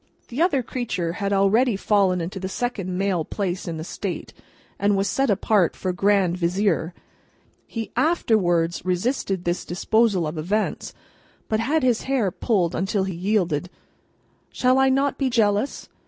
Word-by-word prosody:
[The 250 +6 -3
other 290 -7 +2
creature 185 -9 -3
had 200 +1 -2
already 205 +5 +3
fallen 195 -3 +2
into 180 +4 -5
the 190 0 -4
second 195 -5 -3
male 190 -4 0
place 185 +1 -3
in 165 -1 -3
the 160 - -5
State, - - -5 0.5
and 200 0 +2
was 195 +1 +1
set 270 0 +1
apart 200 -2 +2
for 185 -1 -2
Grand 195 -2 +2
Vizier. 180 -1 0 0.7
He 225 -2 -5
afterwards 175 - +1
resisted 185 0 -1
this 175 0 -1
disposal 195 +1 +1
of 155 +1 -4
events, 205 +7 -2 0.5
but 220 - 0
had 285 +6 +1
his 245 -3 +1
hair 240 -9 +1
pulled 180 -5 0
until 195 +1 0
he 190 -1 -3
yielded.] 180 -3 0 0.8
"Shall 255 +1 +2
I 265 0 +4
not 275 +1 +1
be 270 -2 +1
jealous?" 215 +1 +1
200 Hz, 155 wpm, -23 LUFS, 180-230 Hz, 0.8 s, I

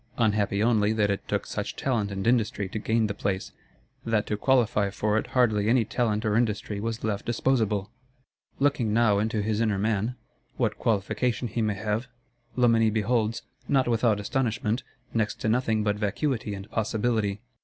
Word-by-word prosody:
Unhappy 105 -2 +1
only 110 -2 +3
that 105 -2 +2
it 100 - -4
took - - -1
such - - -4
talent 115 -6 0
and 95 -1 -4
industry 110 -4 +1
to 105 +3 -4
gain 110 +1 +1
the 105 - -2
place; 100 -2 -3 0.5
that 110 -2 +1
to 105 - -1
qualify 110 -4 +2
for 105 +2 -1
it 110 - 0
hardly 110 -4 +3
any 120 -1 +3
talent 110 -1 0
or 105 -1 +1
industry 105 -3 0
was 115 +2 -3
left 105 -2 -1
disposable! 110 -5 0 0.7
Looking 135 -6 +1
now 110 -4 +4
into 110 0 0
his 110 +1 0
inner 110 -3 +1
man, 110 +3 0 0.4
what - - 0
qualification 115 +3 0
he 115 +2 -2
may 105 -2 0
have, 110 +4 -2 0.5
Loménie 115 -3 +4
beholds, 110 +1 0 0.2
not 135 -3 +2
without 115 -2 +2
astonishment, 115 +1 -1 0.3
next 110 -2 0
to - - -1
nothing 110 -2 +1
but 105 -1 0
vacuity 105 +1 -1
and 95 +1 -8
possibility. 110 -2 0
110 Hz, 165 wpm, -27 LUFS, 105-115 Hz, 0.7 s, now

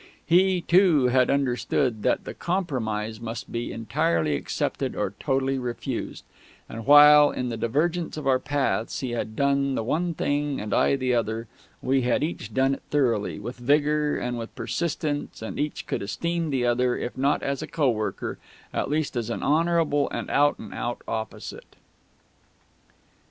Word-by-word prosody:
He, 185 +1 +4
too, 170 -8 +4
had 125 0 +3
understood 130 -3 0
that - - +1
the - - -6
Compromise 110 - -2
must 115 0 -6
be 115 0 -3
entirely 85 -8 0
accepted 70 - -2
or - - -2
totally 135 0 0
refused; 125 0 -4 0.4
and 115 0 -8
while, 145 0 +9
in 125 -1 -3
the 115 - -3
divergence 155 +10 -1
of 150 - -5
our 130 -1 +3
paths, 140 -5 -1
he 130 -3 -3
had 110 -2 -3
done 140 0 +1
the - - -1
one 165 +8 -1
thing 145 -1 -1
and 105 0 -4
I - - +3
the 130 -2 0
other, 115 -1 -1 0.4
we 135 +1 +2
had 125 +3 +1
each 150 -8 -4
done 135 +4 +2
it - - -6
thoroughly, 120 -8 +1
with 120 +5 -7
vigour, 150 +3 +2
and 120 -1 -3
with 115 - -8
persistence, 145 +1 -3
and 110 - -5
each 150 0 -2
could - - -3
esteem 170 - -2
the 130 -3 0
other, 120 +1 +2
if 120 - -4
not 140 +2 +1
as 140 +1 -2
a 155 - -5
co 150 -4 0
worker, 110 -2 -3 0.3
at - - -1
least 150 -1 -1
as 120 -2 -2
an 115 - -3
honourable 160 -1 +2
and - - -5
out 145 0 +3
and 105 - -9
out 120 - -4
opposite. 110 -1 -6
135 Hz, 165 wpm, -25 LUFS, 115-150 Hz, 0.4 s, while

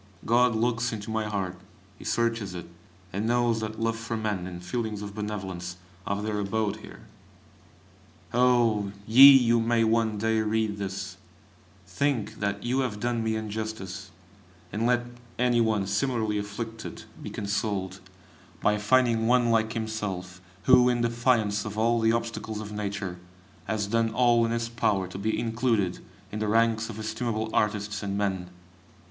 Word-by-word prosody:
God 120 0 +4
looks 120 +2 +1
into 110 -1 -5
my 110 0 -1
heart, 95 -4 -3 0.4
He - - -11
searches 115 -5 0
it, 85 - -6 0.5
and 105 +4 -1
knows 120 -1 +2
that 110 0 -5
love 115 0 0
for 115 0 -4
man 105 -5 -2
and 90 -1 -8
feelings 110 +1 -3
of 100 -1 -7
benevolence 95 -4 -5 0.3
have 100 +1 -1
their 105 -1 -1
abode 105 +1 -1
there! - - -12 1.3
Oh! 120 -5 +3
ye 130 +2 +9
who 115 0 +4
may 115 0 +2
one 110 -1 +2
day 110 +1 +1
read 110 -1 0
this, 95 -1 -5 0.7
think 120 +4 -1
that 100 0 -2
you 125 +3 0
have 120 -6 -1
done 120 0 -1
me 110 0 0
injustice, 105 -3 -5 0.6
and 115 +2 0
let 120 0 +2 0.3
any 120 -1 +3
one 110 -3 +1
similarly 105 +1 0
afflicted 110 +2 -6 0.2
be - - -6
consoled, 100 -2 -2 0.6
by 105 0 +2
finding 115 +1 +3
one 120 -1 +4
like 110 0 +2
himself, 105 -5 -4 0.2
who, 125 -1 +6
in 120 -1 +1
defiance 115 -3 +1
of 105 -1 -6
all 115 +1 +3
the 110 0 +3
obstacles 115 -2 -3
of 105 -1 -7
Nature, 100 -3 -4 0.5
has 110 -2 -1
done 115 +2 +1
all 120 -1 +4
in - - -2
his 115 0 -1
power 105 -5 0
to 95 +1 -8
be 110 +2 0
included 115 -5 0 0.3
in 105 - -4
the 110 - -1
ranks 115 +1 +2
of 110 - -7
estimable 110 0 -2
artists 105 -1 0
and 100 -1 -2
men. 95 -3 -1
110 Hz, 155 wpm, -27 LUFS, 100-115 Hz, 1.3 s, ye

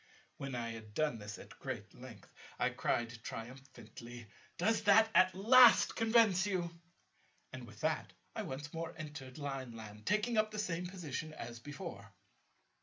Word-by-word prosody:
When 135 -2 -5
I 120 -1 -3
had 110 -2 -9
done 150 -7 0
this 105 0 -7
at - - -13
great - - -6
length, - - -12 0.3
I - - +1
cried 115 -1 -1
triumphantly, 120 -1 -9 0.3
"Does 225 +1 +2
that 220 +2 +6
at 185 0 +5
last 235 +4 +7
convince 220 -4 +4
you?" 180 -4 -1 0.8
And, - - -7
with - - -13
that, - - -1 0.2
I - - -2
once 145 +2 -6
more 165 0 -5
entered 145 -5 -8
Lineland, 115 -7 -6
taking 215 +2 +2
up 215 0 +2
the 215 - -7
same 180 -3 -2
position 155 -4 -5
as 115 -3 -7
before. 120 - -8
145 Hz, 150 wpm, -35 LUFS, 120-190 Hz, 0.8 s, last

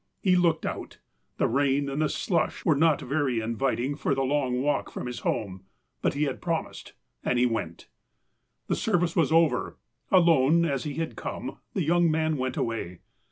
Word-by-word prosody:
He 185 -2 +3
looked 170 -3 +2
out. - - -5 0.4
The - - +2
rain 140 +2 +1
and 140 +2 -2
the 155 - +2
slush 170 -4 -1
were 155 - +4
not 155 0 +3
very 135 -3 0
inviting 120 +4 -1
for 140 -1 0
the 135 - 0
long 130 -2 0
walk 145 +3 0
from - - -6
his 125 -1 -5
home. 95 -3 -3 0.4
But - - 0
he 145 - +1
had 140 -3 -2
promised 165 -2 -4 0.2
— - - -49
and 125 - +1
he 125 - +4
went. 110 -9 -3 0.8
The - - 0
service 175 -6 0
was 160 -3 +2
over. 165 -1 +2 0.3
Alone, 170 -3 +4
as 140 -5 -1
he 145 -2 -4
had 165 0 -3
come, - - -6 0.2
the 190 - +1
young 170 +2 +3
man 155 0 +1
went 130 -1 -2
away. 110 -7 -3
145 Hz, 185 wpm, -27 LUFS, 125-165 Hz, 0.8 s, were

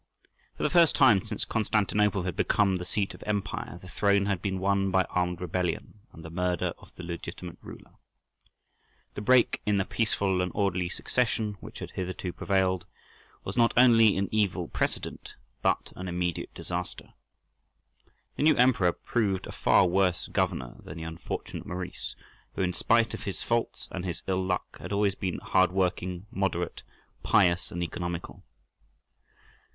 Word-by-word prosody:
For - - -4
the - - +2
first 170 -3 +5
time 105 -7 +6
since 110 -2 -4
Constantinople 105 -2 +1
had 90 -2 -3
become 100 -3 +2
the 90 - -5
seat 100 +2 -1
of - - -13
empire 100 -4 -2
the 95 - -12
throne 100 +1 +2
had 100 -3 -1
been 95 -1 -1
won 95 +1 +1
by 95 0 +3
armed 90 -1 0
rebellion 90 +3 -2
and 80 -1 -12
the 80 - -8
murder 90 0 0
of - - -17
the 90 - -9
legitimate 85 0 -7
ruler. - - -12 1.2
The - - -5
break 125 +2 +4
in 105 -1 +2
the 95 - +1
peaceful 100 -4 0
and 90 -1 -1
orderly 95 -3 +1
succession 110 0 -1
which - - -10
had - - -7
hitherto 90 -1 -4
prevailed 95 -2 0 0.6
was - - -5
not 115 -1 +4
only 115 -5 +6
an 100 0 +1
evil 105 -4 +1
precedent, - - -3 0.3
but - - 0
an 95 - -6
immediate 90 -1 -2
disaster. 90 0 -5 1.2
The - - -2
new 155 0 +5
emperor 115 -9 +4
proved 100 -6 -1
a - - -7
far - - +4
worse 90 0 +2
governor 90 -10 -1
than 75 - -8
the 80 - -6
unfortunate 80 0 -6
Maurice, 90 +1 -5 0.4
who, - - 0
in 90 -1 0
spite 115 +3 +2
of - - -5
his 100 - -4
faults 115 -1 -1
and 95 - -4
his 90 -3 -4
ill 95 -1 0
luck, 90 -1 -3
had - - -7
always 100 -1 +2
been 95 -2 -3
hard 95 -1 +2
working, 90 -1 -1
moderate, 95 -5 -1 0.4
pious, 90 -4 +3
and 85 0 -2
economical. 85 0 -5
95 Hz, 160 wpm, -28 LUFS, 90-105 Hz, 1.2 s, time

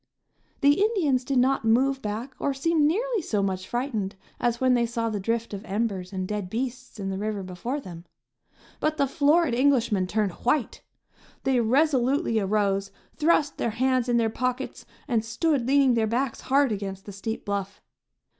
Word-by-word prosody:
The 285 +6 +4
Indians 340 - +2
did 270 +1 -1
not 260 +1 +3
move 265 +4 +2
back 220 +5 -4
or 280 - -1
seem 305 +2 +2
nearly 450 +6 0
so 210 -9 -1
much 185 -1 -2
frightened 240 -6 -2 0.2
as 240 -1 0
when 255 -1 +3
they 240 -1 +2
saw 230 -1 -2
the 210 - -2
drift 230 +3 -2
of 200 0 -5
embers 200 -3 -2
and 185 -1 -3
dead 205 -3 -3
beasts 250 +2 -4
in 195 -1 -3
the 190 - -3
river 210 -1 -2
before 185 +10 -4
them; 175 -9 -10 0.7
but 310 0 0
the 280 - +3
florid 295 +1 +3
Englishmen 240 -7 +2
turned 210 0 0
white! 245 -1 0 0.6
They 265 -2 +2
resolutely 260 0 +2
arose, 200 -1 0 0.3
thrust 305 -2 +2
their - - 0
hands 255 +2 +1
in 240 - +3
their 225 -2 +1
pockets 255 +2 -3 0.2
and 230 -5 +1
stood 260 +2 0
leaning 275 -1 +4
their 225 -2 +2
backs 240 +2 -1
hard 275 -1 +2
against 195 -2 -4
the 205 - -7
steep 220 +3 -5
bluff. 200 -1 -3
235 Hz, 175 wpm, -26 LUFS, 210-275 Hz, 0.7 s, The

